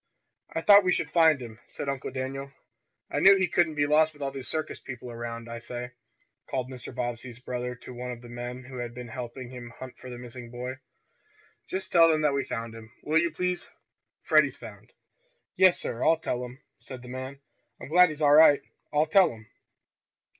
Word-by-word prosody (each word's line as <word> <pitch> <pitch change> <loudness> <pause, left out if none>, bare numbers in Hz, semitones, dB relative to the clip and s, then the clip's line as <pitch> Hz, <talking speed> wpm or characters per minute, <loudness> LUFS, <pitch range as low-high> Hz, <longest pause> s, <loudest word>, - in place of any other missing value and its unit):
"I - - -2
thought 205 -1 +8
we 180 - +2
should - - -1
find 160 -4 +5
him," 115 -2 -9
said - - -6
Uncle 140 -1 -3
Daniel. 135 +1 -5 0.6
"I - - 0
knew 195 +1 +8
he 190 -1 +2
couldn't 165 -2 +2
be 145 -1 +2
lost 155 +2 +4
with 145 - -16
all 135 - -2
these 135 -1 -6
circus 155 -1 -3
people 125 -2 -8
around. 115 0 -6
I 115 0 -6
say!" 125 +1 -6 0.6
called 130 -1 -3
Mr. 125 -3 -8
Bobbsey's 120 -1 -4
brother 125 -1 -4
to 125 +1 -11
one 125 +1 -6
of 125 -1 -7
the - - -10
men 120 +1 -6
who 130 0 -9
had 120 -1 -5
been 125 -1 -7
helping 125 0 -7 0.3
hunt 130 -1 -10
for 130 - -10
the 125 - -7
missing 120 0 -9
boy. 125 +2 -6 0.9
"Just 190 0 -4
tell 165 -1 +7
them 155 -1 +2
that 150 -2 +3
we 140 0 0
found 115 -3 -5
him, 115 0 -12
will 160 +2 +3
you, 170 - +1
please? 180 +2 -3 0.5
Freddie's - - +4
found." - - -12 0.6
"Yes, 185 -1 +5
sir, 115 - -4
I'll 165 - +5
tell 125 -6 -3
'em," 125 +3 -10 0.2
said 130 -2 -10
the - - -11
man. 130 +2 -6 0.4
"I'm - - -9
glad 180 +2 +6
he's 155 0 -5
all 145 0 +6
right. 150 -2 +7 0.3
I'll 150 +1 +3
tell 190 +4 +5
'em!" 110 -1 -14
130 Hz, 205 wpm, -27 LUFS, 120-155 Hz, 0.9 s, thought